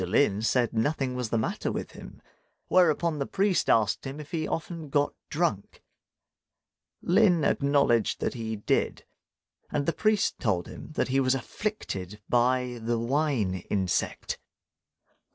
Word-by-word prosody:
Lin 105 Hz, +2 st, +2 dB
said 120 Hz, +1 st, +1 dB
nothing 130 Hz, +3 st, 0 dB
was 125 Hz, -3 st, -3 dB
the 115 Hz, -, +1 dB
matter 110 Hz, -, -1 dB
with -, -, -4 dB
him; -, -, -12 dB, 0.5 s
whereupon 170 Hz, -3 st, +3 dB
the 140 Hz, -, -2 dB
priest 195 Hz, -1 st, +1 dB
asked 110 Hz, +4 st, +2 dB
him 135 Hz, +3 st, -6 dB
if 150 Hz, +1 st, -10 dB
he 160 Hz, -3 st, -1 dB
often 165 Hz, -2 st, -4 dB
got 145 Hz, +1 st, +1 dB, 0.2 s
drunk. 150 Hz, -, -2 dB, 1.2 s
Lin 180 Hz, -3 st, +4 dB
acknowledged 140 Hz, -6 st, +2 dB
that -, -, -1 dB
he 110 Hz, -2 st, -4 dB
did; 105 Hz, -, -1 dB, 0.6 s
and 145 Hz, -1 st, -1 dB
the 170 Hz, -, +1 dB
priest 215 Hz, -1 st, +1 dB
told 95 Hz, -8 st, 0 dB
him -, -, -10 dB
that -, -, 0 dB
he 135 Hz, +1 st, +2 dB
was 130 Hz, 0 st, +3 dB
afflicted 110 Hz, -, -4 dB
by 125 Hz, 0 st, +1 dB
the 115 Hz, +1 st, 0 dB
wine 125 Hz, -4 st, 0 dB, 0.2 s
insect. 95 Hz, -3 st, -1 dB
135 Hz, 140 wpm, -28 LUFS, 115-155 Hz, 1.2 s, Lin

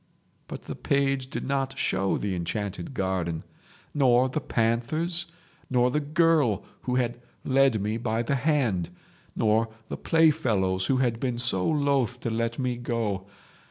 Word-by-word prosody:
"But -, -, -7 dB
the -, -, -6 dB
page 135 Hz, -2 st, 0 dB
did -, -, -4 dB
not 135 Hz, -1 st, -1 dB
show 95 Hz, -6 st, +1 dB
the 100 Hz, -2 st, -2 dB
enchanted 100 Hz, -, -4 dB
garden, 90 Hz, -5 st, -1 dB, 0.5 s
nor 130 Hz, -3 st, +4 dB
the 150 Hz, +4 st, -2 dB
panthers, 140 Hz, +11 st, -1 dB, 0.4 s
nor 125 Hz, -1 st, +3 dB
the 150 Hz, -, +1 dB
girl 150 Hz, -, +2 dB, 0.2 s
who 125 Hz, -, -2 dB
had 120 Hz, -1 st, -1 dB, 0.2 s
led 135 Hz, -4 st, +3 dB
me 105 Hz, +3 st, -1 dB
by 115 Hz, -1 st, -1 dB
the 120 Hz, -, -1 dB
hand, 125 Hz, -, +1 dB, 0.5 s
nor 110 Hz, +1 st, +2 dB, 0.2 s
the -, -, -4 dB
playfellows 105 Hz, -13 st, +2 dB
who 135 Hz, -, +2 dB
had 120 Hz, -3 st, +1 dB
been 125 Hz, -2 st, -1 dB
so 120 Hz, -7 st, +1 dB
loth 140 Hz, -5 st, +1 dB
to 115 Hz, -, -2 dB
let 115 Hz, +1 st, -1 dB
me 125 Hz, -2 st, -1 dB
go. 115 Hz, -5 st, -2 dB
120 Hz, 150 wpm, -27 LUFS, 110-135 Hz, 0.5 s, nor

